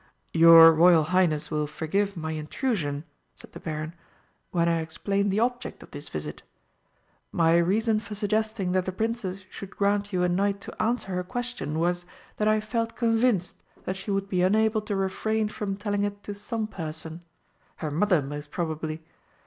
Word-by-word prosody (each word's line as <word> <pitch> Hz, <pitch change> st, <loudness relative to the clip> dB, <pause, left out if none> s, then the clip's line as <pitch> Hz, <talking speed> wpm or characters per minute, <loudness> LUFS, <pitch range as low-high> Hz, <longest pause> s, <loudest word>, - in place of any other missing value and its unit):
"Your 165 Hz, 0 st, +9 dB
Royal 165 Hz, 0 st, +6 dB
Highness 165 Hz, -2 st, +1 dB
will 150 Hz, -1 st, 0 dB
forgive 195 Hz, +6 st, -1 dB
my 160 Hz, -1 st, -3 dB
intrusion," 155 Hz, -, -2 dB, 0.3 s
said -, -, -14 dB
the -, -, -10 dB
Baron, 155 Hz, 0 st, -4 dB, 0.6 s
"when 170 Hz, -1 st, +1 dB
I 165 Hz, -1 st, +2 dB
explain 195 Hz, +5 st, -1 dB
the 200 Hz, +3 st, +1 dB
object 245 Hz, +1 st, -2 dB
of -, -, -17 dB
this -, -, -8 dB
visit. -, -, -6 dB, 0.9 s
My 165 Hz, -2 st, +3 dB
reason 215 Hz, +5 st, +2 dB
for 210 Hz, 0 st, -8 dB
suggesting 215 Hz, -2 st, -1 dB
that 185 Hz, 0 st, +1 dB
the -, -, 0 dB
Princess 195 Hz, -2 st, -3 dB
should 195 Hz, 0 st, -9 dB
grant 200 Hz, 0 st, +1 dB
you 180 Hz, -2 st, +1 dB
a -, -, +3 dB
night 200 Hz, +3 st, +1 dB
to -, -, -7 dB
answer 225 Hz, -3 st, 0 dB
her 180 Hz, 0 st, -1 dB
question 245 Hz, -6 st, -3 dB
was 175 Hz, +1 st, 0 dB, 0.3 s
that 210 Hz, -, +1 dB
I 215 Hz, 0 st, +4 dB
felt 230 Hz, +1 st, -2 dB
convinced 225 Hz, -6 st, +1 dB, 0.3 s
that 185 Hz, -, -3 dB
she 190 Hz, +2 st, -7 dB
would 195 Hz, 0 st, 0 dB
be 185 Hz, -2 st, 0 dB
unable 215 Hz, +3 st, +3 dB
to 210 Hz, -1 st, -3 dB
refrain 210 Hz, +3 st, 0 dB
from 205 Hz, -2 st, -3 dB
telling 205 Hz, -1 st, -1 dB
it 205 Hz, 0 st, -3 dB
to 205 Hz, -, -5 dB
some 220 Hz, +2 st, -3 dB
person 160 Hz, -4 st, -7 dB, 0.5 s
her 155 Hz, -, -4 dB
mother, 175 Hz, 0 st, +2 dB
most 145 Hz, +2 st, -6 dB
probably. 160 Hz, -1 st, -3 dB
190 Hz, 175 wpm, -26 LUFS, 165-215 Hz, 0.9 s, Your